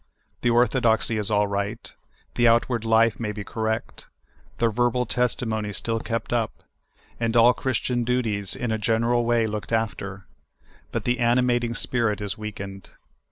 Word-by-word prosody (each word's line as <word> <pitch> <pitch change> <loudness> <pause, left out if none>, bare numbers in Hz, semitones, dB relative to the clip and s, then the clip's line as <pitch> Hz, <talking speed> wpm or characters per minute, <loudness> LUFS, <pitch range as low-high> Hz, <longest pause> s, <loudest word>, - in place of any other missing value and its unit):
The 120 - +2
orthodoxy 115 -2 +2
is 105 - +1
all 105 -1 +3
right; 100 +3 -4 0.4
the 120 - +3
outward 115 0 +2
life 115 -1 +3
may 110 -3 -2
be 105 0 -6
cor 110 +2 -4
rect; 110 0 -3 0.5
the 115 - +2
verbal 120 +2 +1
testimony 110 -3 -1
still 115 +4 -1
kept 115 +1 -3
up; 115 -3 -2 0.6
and 115 0 +1
all 120 +2 +7
Chris 130 0 -1
tian 120 -1 -1
duties 115 -5 0
in 120 -2 -3
a 110 - -1
general 115 +3 +1
way 120 -1 +2
looked 105 0 -4
after; 100 -4 -2 0.7
but - - -2
the 125 0 0
ani 120 +1 +3
mating 120 -1 0
spirit 115 -4 0
is 105 0 -2
weakened. 100 -3 -7
115 Hz, 160 wpm, -24 LUFS, 105-120 Hz, 0.7 s, all